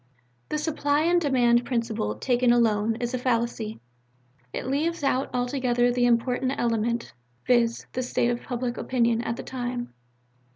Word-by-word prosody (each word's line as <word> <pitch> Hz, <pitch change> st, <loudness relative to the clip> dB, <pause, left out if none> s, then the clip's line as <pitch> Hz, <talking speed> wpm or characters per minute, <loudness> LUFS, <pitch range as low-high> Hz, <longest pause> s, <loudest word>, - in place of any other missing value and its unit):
"The 305 Hz, -, -1 dB
Supply 300 Hz, -1 st, 0 dB
and 345 Hz, +2 st, +3 dB
Demand 245 Hz, -5 st, +3 dB
principle, 230 Hz, -, -2 dB
taken 245 Hz, -, +2 dB
alone, 225 Hz, -2 st, +2 dB
is 240 Hz, +2 st, -3 dB
a 255 Hz, -, -1 dB
fallacy. 235 Hz, -3 st, -1 dB, 0.7 s
It -, -, -4 dB
leaves 300 Hz, +5 st, -1 dB
out 275 Hz, -1 st, +1 dB
altogether 245 Hz, -1 st, +1 dB
the 245 Hz, 0 st, +2 dB
most 235 Hz, -1 st, +5 dB
important 255 Hz, +2 st, -1 dB
element, 235 Hz, 0 st, -1 dB, 0.3 s
viz. 235 Hz, -2 st, +2 dB
the 255 Hz, -, -1 dB
state 245 Hz, -1 st, 0 dB
of 240 Hz, -, -3 dB
public 245 Hz, -1 st, -3 dB
opinion 235 Hz, -2 st, +1 dB
at 235 Hz, -1 st, -2 dB
the -, -, -7 dB
time. 245 Hz, -1 st, -4 dB
245 Hz, 155 wpm, -26 LUFS, 235-255 Hz, 0.7 s, most